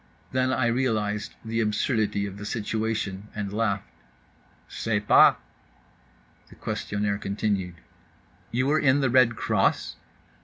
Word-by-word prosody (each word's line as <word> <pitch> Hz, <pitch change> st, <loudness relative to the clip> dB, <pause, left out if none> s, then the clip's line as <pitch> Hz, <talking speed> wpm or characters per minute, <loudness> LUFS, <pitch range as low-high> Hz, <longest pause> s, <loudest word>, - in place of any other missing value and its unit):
Then 130 Hz, 0 st, +1 dB
I 130 Hz, -1 st, +1 dB
realized 110 Hz, -4 st, -1 dB
the 115 Hz, +1 st, -2 dB
absurdity 105 Hz, -2 st, 0 dB
of 100 Hz, -1 st, -7 dB
the -, -, -7 dB
situation, 105 Hz, -2 st, -3 dB
and 105 Hz, -2 st, -4 dB
laughed.—"Sais 100 Hz, -, -4 dB
pas." -, -, +7 dB, 1.1 s
The -, -, -15 dB
questionnaire 105 Hz, 0 st, -2 dB
continued: 100 Hz, -3 st, -2 dB, 0.7 s
"You 125 Hz, +2 st, 0 dB
were 150 Hz, +3 st, +3 dB
in 140 Hz, -1 st, +3 dB
the 135 Hz, -3 st, +1 dB
Red 125 Hz, -2 st, +5 dB
Cross?" -, -, 0 dB
105 Hz, 115 wpm, -26 LUFS, 100-120 Hz, 1.1 s, pas